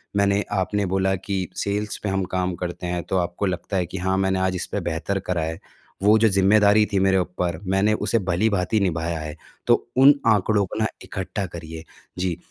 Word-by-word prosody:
मैंने 100 Hz, 0 st, +2 dB
आपने 100 Hz, +1 st, 0 dB
बोला 95 Hz, +1 st, +1 dB
कि 95 Hz, 0 st, -3 dB
सेल्स 105 Hz, +1 st, -2 dB
में 100 Hz, -, 0 dB
हम 95 Hz, 0 st, 0 dB
काम 90 Hz, 0 st, -1 dB
करते 90 Hz, 0 st, -5 dB
हैं 90 Hz, -1 st, -2 dB
तो 95 Hz, -, -1 dB
आपको 90 Hz, +3 st, -1 dB
लगता 90 Hz, +2 st, -2 dB
है 90 Hz, -, +1 dB
कि 90 Hz, +3 st, -7 dB
हाँ, 95 Hz, +1 st, 0 dB
मैंने 95 Hz, 0 st, +1 dB
आज 95 Hz, 0 st, 0 dB
इस 90 Hz, -, -3 dB
पे -, -, -1 dB
बेहतर 85 Hz, +4 st, -2 dB
करा 90 Hz, -2 st, -2 dB
है। 80 Hz, +1 st, -4 dB, 0.4 s
वो 105 Hz, +2 st, +6 dB
जो 110 Hz, -, +5 dB
ज़िम्मेदारी 100 Hz, +2 st, +4 dB
थी 100 Hz, -, +3 dB
मेरे 95 Hz, 0 st, +3 dB
ऊपर 90 Hz, -2 st, -2 dB
मैंने 95 Hz, +3 st, +2 dB
उसे 115 Hz, -, +2 dB
भली-भांति 100 Hz, +3 st, +1 dB
निभाया 85 Hz, -3 st, -1 dB
है। 75 Hz, 0 st, -6 dB, 0.3 s
तो -, -, +7 dB, 0.2 s
उन 135 Hz, +2 st, +8 dB
आंकड़ों 105 Hz, -1 st, +3 dB
को 105 Hz, -, -6 dB
ना 110 Hz, -, +2 dB, 0.2 s
इकट्ठा 95 Hz, +1 st, -4 dB
करिए। 80 Hz, -2 st, -8 dB, 0.3 s
जी, 90 Hz, -2 st, -1 dB
95 Hz, 200 wpm, -23 LUFS, 90-100 Hz, 0.4 s, उन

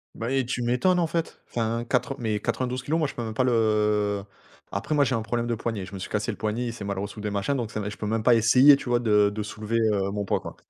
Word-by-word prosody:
Mais 130 Hz, +3 st, -1 dB
tu 125 Hz, 0 st, -3 dB
m'étonnes, 125 Hz, +10 st, +2 dB
en 170 Hz, -, +2 dB
fait, 165 Hz, 0 st, -3 dB
enfin, 115 Hz, 0 st, -1 dB
quatre 135 Hz, +1 st, 0 dB
mais 110 Hz, -3 st, -1 dB
92 125 Hz, +1 st, -2 dB
kilogrammes, 160 Hz, +6 st, 0 dB
moi, 155 Hz, -, +1 dB
je -, -, -9 dB
peux 120 Hz, -, -4 dB
même 110 Hz, -1 st, -4 dB
pas 130 Hz, -, +1 dB
le 105 Hz, -3 st, +2 dB, 0.5 s
après, 100 Hz, +9 st, -2 dB
moi, 145 Hz, -, +4 dB
j'ai 130 Hz, -, 0 dB
un 115 Hz, -, -1 dB
problème 120 Hz, +1 st, -2 dB
de 120 Hz, -, 0 dB
poignet. 110 Hz, -3 st, -3 dB
Je 95 Hz, -, -13 dB
me 95 Hz, -, -6 dB
suis -, -, -6 dB
cassé 105 Hz, +2 st, -1 dB
le 105 Hz, -, -8 dB
poignet. 110 Hz, +3 st, -2 dB
Il 115 Hz, -, -4 dB
s'est 110 Hz, -4 st, -7 dB
mal 100 Hz, -1 st, -3 dB
ressoudé, 105 Hz, +2 st, -4 dB
machin. 100 Hz, +7 st, -1 dB
Donc 120 Hz, -4 st, -3 dB
ça 110 Hz, -, -3 dB
mais 105 Hz, -, -3 dB
je 105 Hz, -, -9 dB
peux -, -, -5 dB
même 110 Hz, +1 st, -1 dB
pas 120 Hz, 0 st, +6 dB
essayer, 125 Hz, +6 st, +7 dB
tu 135 Hz, -, -6 dB
vois, 120 Hz, 0 st, +3 dB
de 105 Hz, -3 st, +4 dB
de 105 Hz, +1 st, -4 dB
soulever, 110 Hz, +2 st, -3 dB
heu, 105 Hz, -3 st, +1 dB
mon 100 Hz, 0 st, -3 dB
poids, -, -, 0 dB
quoi. -, -, -8 dB
115 Hz, 285 wpm, -26 LUFS, 105-125 Hz, 0.5 s, essayer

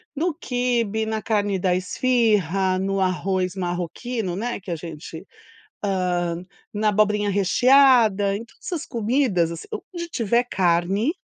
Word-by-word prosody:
no 330 Hz, +3 st, 0 dB
quibe, 240 Hz, -, -1 dB
na 220 Hz, 0 st, -2 dB
carne 205 Hz, -3 st, 0 dB
da 180 Hz, -1 st, +1 dB
esfiha, 195 Hz, -, +1 dB
no 195 Hz, 0 st, -1 dB
arroz 185 Hz, 0 st, 0 dB
marroquino, 180 Hz, +3 st, -3 dB
né, 235 Hz, -2 st, -3 dB
que 180 Hz, -, -7 dB
a -, -, -1 dB
gente, 160 Hz, +2 st, -9 dB, 0.6 s
hã, 180 Hz, -2 st, -1 dB, 0.3 s
na 210 Hz, +1 st, 0 dB
abobrinha 210 Hz, 0 st, +2 dB
recheada 215 Hz, -1 st, +4 dB
em 220 Hz, -, -5 dB
todas 235 Hz, -, -20 dB
essas 335 Hz, -4 st, -3 dB
comidas, 225 Hz, -, +1 dB
assim 165 Hz, -, -8 dB, 0.3 s
onde 340 Hz, -1 st, -5 dB
tiver 235 Hz, 0 st, +1 dB
carne, 190 Hz, -, +1 dB
205 Hz, 135 wpm, -23 LUFS, 185-235 Hz, 0.6 s, recheada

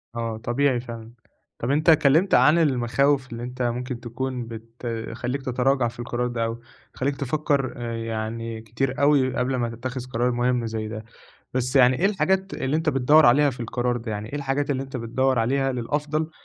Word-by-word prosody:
آه، 115 Hz, -1 st, -3 dB
طبيعي 120 Hz, +3 st, +1 dB
فعلًا، 115 Hz, -2 st, -8 dB, 0.5 s
طَب 120 Hz, -, -1 dB
أنت 150 Hz, +3 st, +2 dB
اتكلّمت 160 Hz, +4 st, +4 dB
عن 155 Hz, +3 st, +6 dB
المخاوف 135 Hz, -2 st, +2 dB
اللي 115 Hz, 0 st, -6 dB
أنت 125 Hz, +1 st, -6 dB
ممكن 125 Hz, +1 st, -2 dB
تكون 125 Hz, +1 st, -4 dB
بتخلّيك 115 Hz, +2 st, -5 dB
تتراجع 130 Hz, 0 st, +1 dB
في 120 Hz, +1 st, -9 dB
القرار 120 Hz, 0 st, -2 dB
ده، 120 Hz, -2 st, -1 dB
أو 115 Hz, +1 st, -4 dB, 0.3 s
تخلّيك 140 Hz, +2 st, -1 dB
تفكّر 140 Hz, -1 st, 0 dB
آآ 120 Hz, -1 st, -4 dB
يعني 115 Hz, 0 st, -4 dB
كتير 125 Hz, +5 st, -2 dB
أوي 140 Hz, -3 st, +3 dB
قبل 125 Hz, +1 st, 0 dB
ما 120 Hz, -2 st, -1 dB
تتخذ 125 Hz, +3 st, -5 dB
قرار 125 Hz, 0 st, 0 dB
مهمّ 120 Hz, -1 st, 0 dB
زَيّ 110 Hz, -1 st, -3 dB
ده، 110 Hz, 0 st, -6 dB, 0.5 s
بَس 130 Hz, +1 st, 0 dB
يعني 130 Hz, -1 st, +5 dB
إيه 190 Hz, -, +3 dB
الحاجات 190 Hz, -1 st, 0 dB
اللي 135 Hz, +3 st, -1 dB
أنت 160 Hz, 0 st, -1 dB
بتدوّر 145 Hz, +3 st, +5 dB
عليها 140 Hz, +4 st, +5 dB
في 125 Hz, -, -10 dB
القرار 120 Hz, +1 st, -1 dB
ده؟ 115 Hz, -1 st, -5 dB
يعني 105 Hz, +1 st, -5 dB
إيه 140 Hz, -, -5 dB
الحاجات 140 Hz, 0 st, -1 dB
اللي 135 Hz, -1 st, 0 dB
أنت 135 Hz, -1 st, -7 dB
بتدوّر 125 Hz, +2 st, 0 dB
عليها 135 Hz, +4 st, +1 dB
للأفضل، 150 Hz, +5 st, -2 dB
125 Hz, 180 wpm, -24 LUFS, 115-140 Hz, 0.5 s, عن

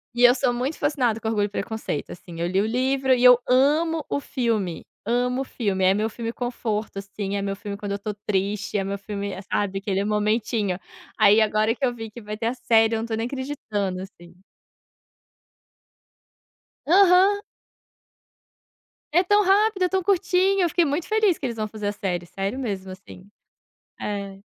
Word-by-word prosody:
E 245 Hz, -, +1 dB
eu 245 Hz, +1 st, +7 dB
sou 245 Hz, -1 st, +1 dB
muito 260 Hz, +6 st, -2 dB
fascinada 255 Hz, -7 st, 0 dB
com 220 Hz, -, -5 dB
Orgulho 210 Hz, -2 st, +1 dB
e -, -, -4 dB
Preconceito 210 Hz, -7 st, -4 dB
assim. 170 Hz, -1 st, -10 dB
Eu 170 Hz, -, 0 dB
li 190 Hz, +2 st, +1 dB
o -, -, 0 dB
livro 260 Hz, +3 st, +1 dB
e 245 Hz, -, +1 dB
eu 250 Hz, -1 st, +8 dB
amo 300 Hz, +5 st, +3 dB
o -, -, -1 dB
filme, 225 Hz, -, -2 dB, 0.2 s
amo 250 Hz, +3 st, 0 dB
o -, -, -1 dB
filme. 200 Hz, -7 st, -2 dB
É 190 Hz, -, +5 dB
meu 215 Hz, +2 st, 0 dB
filme 230 Hz, +1 st, -5 dB
conforto 225 Hz, -4 st, -3 dB
assim. 200 Hz, 0 st, -5 dB
É 200 Hz, -, -1 dB
meu 195 Hz, 0 st, -2 dB
filme 200 Hz, 0 st, -6 dB
quando 200 Hz, -1 st, -4 dB
eu -, -, 0 dB
estou 205 Hz, +1 st, -4 dB
triste, 205 Hz, +1 st, -1 dB
é 195 Hz, -, 0 dB
meu 195 Hz, +1 st, -3 dB
filme, 200 Hz, 0 st, -5 dB, 0.2 s
sabe, 195 Hz, -1 st, 0 dB
aquele 195 Hz, -1 st, -1 dB
momentinho. 210 Hz, -2 st, 0 dB, 0.4 s
Aí 215 Hz, 0 st, +6 dB
agora 215 Hz, +1 st, +2 dB
que 255 Hz, -, -10 dB
eu 250 Hz, -2 st, +2 dB
vi 225 Hz, -2 st, -7 dB
que 235 Hz, -, -10 dB
vai 210 Hz, 0 st, -6 dB
ter 225 Hz, -, -4 dB
a 235 Hz, -, 0 dB
série 225 Hz, -3 st, +3 dB
e -, -, +2 dB
eu -, -, -1 dB
não -, -, -3 dB
estou 225 Hz, -1 st, -3 dB
nem 225 Hz, -, -1 dB
acreditando 235 Hz, -8 st, -3 dB
assim. 175 Hz, -3 st, -14 dB, 2.5 s
Aham. 385 Hz, +3 st, +5 dB, 1.7 s
É 350 Hz, +4 st, +4 dB
tão 410 Hz, +3 st, +4 dB
rápido, 400 Hz, 0 st, +3 dB
é 365 Hz, -, +2 dB
tão 380 Hz, +1 st, +1 dB
curtinho. 385 Hz, 0 st, +2 dB
Eu 350 Hz, -, +2 dB
fiquei 345 Hz, +1 st, +2 dB
muito 295 Hz, +3 st, -2 dB
feliz 430 Hz, -5 st, +2 dB
que -, -, -5 dB
eles 240 Hz, -2 st, -3 dB
vão 215 Hz, 0 st, -2 dB
fazer 210 Hz, -1 st, -5 dB
a -, -, +1 dB
série, 180 Hz, -4 st, -3 dB
sério 195 Hz, +7 st, -4 dB
mesmo 195 Hz, -7 st, -4 dB
assim. 185 Hz, 0 st, -13 dB, 0.7 s
É. 200 Hz, -1 st, -5 dB
220 Hz, 190 wpm, -24 LUFS, 200-265 Hz, 2.5 s, eu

